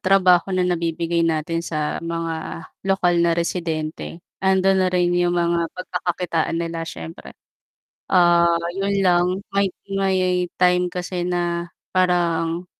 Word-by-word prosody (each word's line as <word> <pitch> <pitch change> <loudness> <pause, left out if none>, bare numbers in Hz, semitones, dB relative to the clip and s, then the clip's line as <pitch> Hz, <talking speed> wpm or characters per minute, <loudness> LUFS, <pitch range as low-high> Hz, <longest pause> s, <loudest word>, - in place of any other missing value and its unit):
trabaho 185 -1 +4
na 185 -1 +1
nabibigay 170 -1 -1
natin 165 +1 -1
sa 155 -2 -2
mga 165 -1 -4 0.2
lokal 190 -2 +2
na 170 - +3
residente, 165 -1 -3 0.2
ando'n 190 0 +3
na - - +2
rin 180 -1 +2
yung 175 0 +2
mga 170 -1 +1
pagkakakitaan 175 -2 -2
nila 165 -1 -3
siyempre. 80 - -9 0.8
Ah, 175 -2 +5 0.3
'yun 200 +1 0
lang 175 -1 +4 0.3
may 200 0 +3 0.2
may 185 -2 +1
time 180 0 +3
kasi 180 0 -4
na 175 -1 -1 0.2
parang 175 -2 +1
175 Hz, 120 wpm, -22 LUFS, 165-180 Hz, 0.8 s, Ah